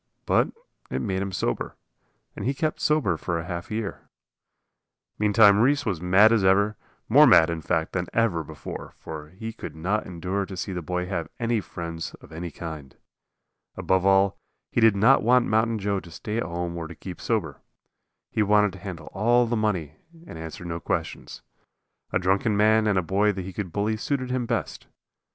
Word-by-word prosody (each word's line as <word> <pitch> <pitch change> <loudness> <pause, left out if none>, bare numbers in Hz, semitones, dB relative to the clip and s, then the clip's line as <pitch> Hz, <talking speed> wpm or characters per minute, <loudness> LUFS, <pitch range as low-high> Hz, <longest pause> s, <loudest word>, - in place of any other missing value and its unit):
But - - +2 0.4
it - - -2
made 95 -4 -2
him 100 0 -3
sober, 90 -9 -2 0.6
and - - -6
he 135 +2 0
kept 155 +3 -2
sober 150 - +2
for 85 +1 -2
half 85 0 -6
a 105 - -3
year. 110 -3 -5 1.1
Meantime 105 -1 +6
Reese 140 +4 +3
was 95 -7 -2
mad 95 +5 +6
as 115 -4 +3
ever, 100 +3 +3 0.3
more - - +7
mad, 80 +1 +6
in 85 -1 -4
fact, 80 0 -1
than 90 -2 -1
ever 105 -8 +1
before. 75 -1 -8
For 75 -1 -8
he 110 +6 -7
could - - -8
not 95 +7 -1
endure 95 +3 -3
to 95 0 -8
see 95 - -3
the 90 - -3
boy 90 +2 -2
have 90 -3 -3
any 115 -2 +1
friends 85 -3 -6
of - - -17
any 85 +2 -5
kind. 75 -5 -8 0.8
Above 95 -1 +1
all, 95 0 +3 0.3
he 120 - +1
did 110 -2 +6
not 115 +7 +5
want 125 +2 +4
Mountain 110 +1 +1
Joe 100 -1 -1
to 85 - -13
stay 105 +6 -5
at 115 - 0
home 85 0 -3
or 80 -1 -4
keep 90 +2 -9
sober. - - -2 0.7
He 110 - 0
wanted 105 -1 +3
to 95 - -10
handle 90 -4 -8
all 120 +5 +3
the 120 +1 -1
money 90 -9 -1 0.3
and - - -10
answer 80 +3 -8
no 85 -1 -4
questions. - - -4 0.7
A - - +2
drunken 95 +4 +1
man 110 +1 +4
and 100 -2 +2
a 90 - +2
boy 100 +5 +2
that 95 -1 -5
he 95 - -7
could 95 -4 -4
bully 105 +4 0
suited 130 +2 -2
him 125 -2 -1
best. - - -3
95 Hz, 190 wpm, -25 LUFS, 85-110 Hz, 1.1 s, more